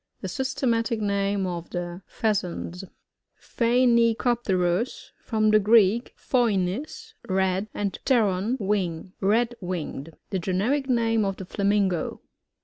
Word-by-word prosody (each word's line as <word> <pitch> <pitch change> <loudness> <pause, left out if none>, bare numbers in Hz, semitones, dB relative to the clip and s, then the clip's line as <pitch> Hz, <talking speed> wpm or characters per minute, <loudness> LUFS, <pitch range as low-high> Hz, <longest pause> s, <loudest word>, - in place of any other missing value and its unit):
The - - -4
systematic 245 -4 -1
name 200 -1 0
of 175 -2 -5
the 175 0 -5
Pheasants. 190 -4 -2 0.6
pHOBNicoPTERus. 235 -4 +1
— - - -44
From 215 -2 +2
the 215 - +6
Greek, 215 +2 +3
phoinix, 240 - -1 0.2
red, 190 +1 +1
and 200 -2 -3
pteron^ 225 -1 +1
wing. 190 -3 -2
Red 230 +5 +2
winged. 165 -4 -5 0.2
The 190 - 0
generic 220 - 0
name 225 -3 +2
of 195 -1 -2
the 190 - -7
Flamingo. 200 -2 0
205 Hz, 115 wpm, -25 LUFS, 185-235 Hz, 0.6 s, the